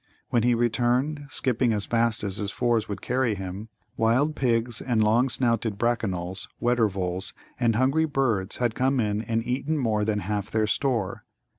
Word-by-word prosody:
When 120 Hz, -2 st, +2 dB
he 120 Hz, +1 st, +3 dB
returned, 125 Hz, +5 st, +1 dB
skipping 125 Hz, -3 st, +1 dB
as 105 Hz, -2 st, -1 dB
fast 115 Hz, -2 st, +1 dB
as 100 Hz, -1 st, -2 dB
his 105 Hz, -2 st, -2 dB
fours 115 Hz, 0 st, 0 dB
would 100 Hz, -2 st, -5 dB
carry 125 Hz, -3 st, +1 dB
him, 95 Hz, +3 st, -6 dB, 0.3 s
wild 130 Hz, +7 st, +2 dB
pigs 120 Hz, -3 st, 0 dB
and 115 Hz, -4 st, +1 dB
long 115 Hz, +5 st, +3 dB
snouted 115 Hz, -4 st, 0 dB
Brackanolls, 95 Hz, -6 st, -1 dB
Weddervols, 95 Hz, -6 st, 0 dB, 0.3 s
and 115 Hz, -3 st, +2 dB
hungry 135 Hz, +7 st, +2 dB
birds 120 Hz, -10 st, 0 dB
had 120 Hz, -2 st, 0 dB
come 130 Hz, +2 st, +1 dB
in 105 Hz, -2 st, 0 dB
and 115 Hz, 0 st, -2 dB
eaten 135 Hz, +5 st, -1 dB
more 110 Hz, -6 st, +1 dB
than 105 Hz, -1 st, 0 dB
half 105 Hz, +2 st, -3 dB
their 110 Hz, -1 st, +1 dB
store. 115 Hz, -3 st, -1 dB
115 Hz, 165 wpm, -26 LUFS, 105-125 Hz, 0.3 s, he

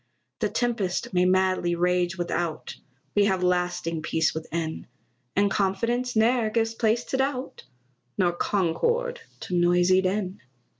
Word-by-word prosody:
The 215 Hz, -, 0 dB
tempest 220 Hz, -6 st, -1 dB
may 180 Hz, 0 st, +3 dB
madly 185 Hz, -1 st, +2 dB
rage 180 Hz, +1 st, +1 dB
without, 175 Hz, -2 st, -3 dB, 0.4 s
We 205 Hz, -1 st, +4 dB
have 190 Hz, -2 st, +1 dB
lasting 180 Hz, -2 st, 0 dB
peace 160 Hz, +1 st, 0 dB
within; 160 Hz, 0 st, -4 dB, 0.5 s
And 200 Hz, 0 st, +3 dB
confidence 230 Hz, +5 st, 0 dB
ne'er 225 Hz, 0 st, +3 dB
gives 225 Hz, 0 st, 0 dB
place 225 Hz, +1 st, +1 dB
to 265 Hz, -, -3 dB
doubt, 265 Hz, -1 st, -2 dB, 0.5 s
Nor 180 Hz, -3 st, +3 dB
concord 470 Hz, -, 0 dB, 0.2 s
to -, -, -6 dB
noisy 175 Hz, +1 st, +4 dB
din. 190 Hz, 0 st, -2 dB
190 Hz, 130 wpm, -26 LUFS, 175-225 Hz, 0.5 s, We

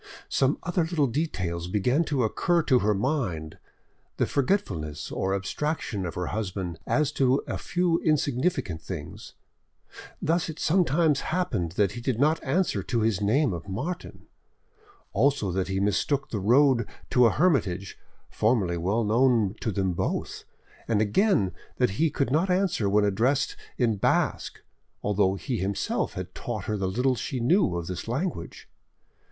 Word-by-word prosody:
Some 135 Hz, +2 st, +2 dB
other 175 Hz, +1 st, 0 dB
little 160 Hz, -3 st, +1 dB
details 90 Hz, -, -2 dB
began 125 Hz, -, +1 dB
to 140 Hz, -5 st, 0 dB
occur 170 Hz, -, +1 dB
to 130 Hz, -4 st, +4 dB
her 105 Hz, -1 st, +2 dB
mind—the 95 Hz, -, -4 dB
forgetfulness 95 Hz, -, -1 dB
or 95 Hz, +1 st, -1 dB
abstraction 100 Hz, -, -2 dB
of 85 Hz, -, -6 dB
her 90 Hz, -, -2 dB
husband 95 Hz, -4 st, -4 dB
as 150 Hz, -1 st, +2 dB
to 135 Hz, -1 st, +2 dB
a -, -, -4 dB
few 175 Hz, -1 st, +1 dB
insignificant 135 Hz, -, 0 dB
things; 80 Hz, -5 st, -8 dB, 0.8 s
thus 170 Hz, +2 st, 0 dB
it 160 Hz, -, -6 dB
sometimes 160 Hz, -3 st, +2 dB
happened 120 Hz, -, -1 dB
that 100 Hz, 0 st, +2 dB
he 120 Hz, -, -7 dB
did 120 Hz, -1 st, -1 dB
not 155 Hz, +3 st, +2 dB
answer 175 Hz, -, 0 dB
to 115 Hz, +4 st, -1 dB
his 110 Hz, -3 st, +1 dB
name 115 Hz, +4 st, +2 dB
of 85 Hz, +3 st, -7 dB
Martin, 150 Hz, -, -5 dB, 0.9 s
also 135 Hz, -8 st, +2 dB
that 95 Hz, +1 st, -1 dB
he 95 Hz, 0 st, -1 dB
mistook 120 Hz, +8 st, 0 dB
the 105 Hz, -, -1 dB
road 120 Hz, +2 st, +4 dB, 0.2 s
to 125 Hz, -1 st, +6 dB
a -, -, +2 dB
hermitage, 105 Hz, -, +1 dB, 0.3 s
formerly 105 Hz, -6 st, +1 dB
well 100 Hz, +7 st, 0 dB
known 115 Hz, -2 st, +3 dB
to 115 Hz, -, -1 dB
them 95 Hz, -2 st, 0 dB
both, -, -, -3 dB, 0.4 s
and 110 Hz, -3 st, +2 dB
again 110 Hz, -, +2 dB, 0.3 s
that 125 Hz, -6 st, +2 dB
he 165 Hz, -, +4 dB
could 140 Hz, -2 st, -1 dB
not 165 Hz, +7 st, +2 dB
answer 180 Hz, -, +1 dB
when 105 Hz, +1 st, +3 dB
addressed 120 Hz, +8 st, +1 dB, 0.2 s
in 115 Hz, -4 st, +1 dB
Basque, -, -, 0 dB, 0.4 s
although 100 Hz, -2 st, +2 dB
he 125 Hz, +5 st, -3 dB
him 100 Hz, +2 st, -1 dB
self -, -, -1 dB
had -, -, -6 dB
taught 110 Hz, -4 st, -5 dB
her 110 Hz, -1 st, -1 dB
the 95 Hz, -2 st, -1 dB
little 125 Hz, +7 st, +1 dB
she 125 Hz, +2 st, -3 dB
knew 125 Hz, -, +3 dB
of 85 Hz, -1 st, -3 dB
this 90 Hz, +4 st, -5 dB
language. 130 Hz, -, -4 dB
115 Hz, 155 wpm, -26 LUFS, 95-150 Hz, 0.9 s, to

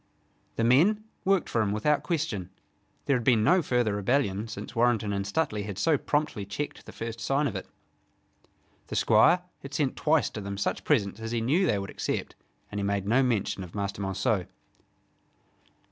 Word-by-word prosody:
The 115 Hz, -, 0 dB
men 170 Hz, -, +4 dB, 0.2 s
worked 195 Hz, -1 st, +2 dB
for 115 Hz, -, 0 dB
him 105 Hz, -2 st, 0 dB
without 140 Hz, +8 st, +1 dB
question. 140 Hz, -, -2 dB, 0.6 s
There 140 Hz, -, +3 dB
had 125 Hz, -, -1 dB
been 115 Hz, -3 st, +4 dB
no 180 Hz, +10 st, +5 dB
further 120 Hz, -7 st, +1 dB
rebellion 105 Hz, 0 st, 0 dB
since 115 Hz, +3 st, -8 dB
Warrenton 115 Hz, -3 st, +2 dB
and 100 Hz, 0 st, -2 dB
Stuteley 105 Hz, -4 st, -1 dB
had 100 Hz, -3 st, -6 dB
so 155 Hz, +9 st, +3 dB
promptly 145 Hz, -6 st, -1 dB
checked 100 Hz, +10 st, -5 dB
the -, -, -8 dB
first 115 Hz, 0 st, -6 dB
sign 135 Hz, +6 st, +1 dB
of -, -, -2 dB
it. -, -, -5 dB, 1.2 s
The -, -, -5 dB
Squire 180 Hz, +1 st, +5 dB, 0.2 s
had 140 Hz, +1 st, -8 dB
sent 140 Hz, -4 st, 0 dB
twice 155 Hz, -3 st, +2 dB
to 105 Hz, -, -6 dB
them 100 Hz, 0 st, -5 dB
such 100 Hz, -, -2 dB
presents 100 Hz, +1 st, +1 dB
as 115 Hz, 0 st, -5 dB
he 120 Hz, -, +1 dB
knew 150 Hz, +12 st, +2 dB
they 105 Hz, -, +2 dB
would 100 Hz, 0 st, -5 dB
accept, -, -, -3 dB, 0.4 s
and 105 Hz, -, -3 dB
he -, -, -2 dB
made 100 Hz, -1 st, -1 dB
no 120 Hz, +5 st, +4 dB
mention 115 Hz, -6 st, 0 dB
of 90 Hz, +1 st, -11 dB
Master 100 Hz, -1 st, -3 dB
Monceux. 95 Hz, 0 st, 0 dB
115 Hz, 185 wpm, -28 LUFS, 100-145 Hz, 1.2 s, no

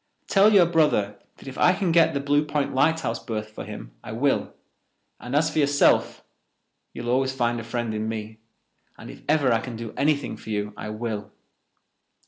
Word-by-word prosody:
Tell 200 Hz, +2 st, +5 dB
your 195 Hz, -4 st, +6 dB
brother 150 Hz, -12 st, +1 dB, 0.2 s
that -, -, -14 dB
if 130 Hz, -, -7 dB
I 180 Hz, -, +5 dB
can 185 Hz, -2 st, 0 dB
get 165 Hz, -3 st, +4 dB
the -, -, +1 dB
Blue 145 Hz, +1 st, +2 dB
Point 150 Hz, -1 st, -2 dB
lighthouse 140 Hz, -4 st, +1 dB
berth 110 Hz, -2 st, -5 dB
for -, -, -8 dB
him -, -, -9 dB
I 105 Hz, -, -7 dB
will, 135 Hz, +4 st, 0 dB, 0.7 s
and 125 Hz, +3 st, -5 dB
as 155 Hz, +2 st, +2 dB
for -, -, -1 dB
yourself, 145 Hz, -1 st, +2 dB, 0.7 s
you 120 Hz, -, -8 dB
will 120 Hz, -, -1 dB
always 130 Hz, +1 st, +1 dB
find 120 Hz, -2 st, 0 dB
a -, -, -6 dB
friend 115 Hz, -1 st, -3 dB
in 110 Hz, +1 st, -2 dB
me, 110 Hz, 0 st, -6 dB, 0.6 s
and -, -, -10 dB
if -, -, -13 dB
I 135 Hz, -7 st, +3 dB
can 125 Hz, +1 st, -7 dB
ever -, -, -7 dB
do 115 Hz, -1 st, -7 dB
anything 145 Hz, 0 st, 0 dB
for -, -, -12 dB
you 105 Hz, -1 st, -2 dB
I 105 Hz, -, -7 dB
will." 110 Hz, -2 st, -5 dB
130 Hz, 195 wpm, -24 LUFS, 110-150 Hz, 0.7 s, your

